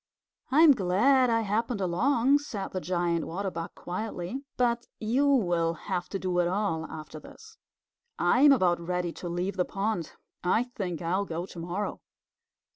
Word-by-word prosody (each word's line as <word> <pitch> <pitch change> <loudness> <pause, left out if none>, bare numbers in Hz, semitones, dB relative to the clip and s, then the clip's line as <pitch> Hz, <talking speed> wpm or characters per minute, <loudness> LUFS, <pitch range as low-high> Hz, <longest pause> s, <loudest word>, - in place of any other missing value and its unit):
"I'm 305 +3 +7
glad 250 +5 +3
I 230 0 +2
happened 225 +2 -1
along," 240 +9 +2
said 210 -9 -5
the 185 - -3
Giant 175 -1 -1
Water 190 +3 -3
Bug 165 -1 -6
quietly, 210 +6 -5
"but 240 -1 +1
you 245 +6 +1
will 175 -10 +2
have 175 +1 -4
to 195 - -2
do 185 -2 -1
it 175 - +3
all 175 -4 -1
after 155 0 -8
this. 445 - -15 0.6
I'm 285 +3 +5
about 180 -10 +3
ready 175 0 -2
to 175 - -6
leave 180 +3 -2
the 180 - +3
pond. 195 -4 -2 0.3
I 185 +6 +2
think 190 -9 -5
I'll 185 +4 0
go 170 0 -4
to 180 - -10
morrow." 180 +5 -4
195 Hz, 160 wpm, -28 LUFS, 175-235 Hz, 0.6 s, I'm